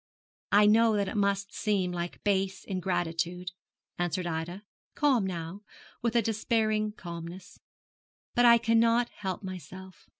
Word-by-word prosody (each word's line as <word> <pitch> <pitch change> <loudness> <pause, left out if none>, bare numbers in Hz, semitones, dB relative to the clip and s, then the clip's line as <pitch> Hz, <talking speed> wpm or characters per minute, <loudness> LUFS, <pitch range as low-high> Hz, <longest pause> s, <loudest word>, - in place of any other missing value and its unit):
'I 205 +1 +6
know 220 +1 +5
that 200 -1 0
it - - -4
must 200 -1 0
seem 195 -4 0
like 175 0 -5
base 195 -1 0
ingratitude,' 180 -1 -2 0.5
answered 175 +1 -1
Ida, 170 +4 -4 0.3
calm 265 -9 +3
now, 170 +2 -5 0.4
with 235 0 -1
a 235 - +4
despairing 215 -1 0
calmness; 170 -1 -9 0.7
'but 245 - +3
I 235 -1 +8
cannot 230 +1 +3
help 190 0 -5
myself. 185 0 -9
195 Hz, 130 wpm, -29 LUFS, 180-220 Hz, 0.7 s, I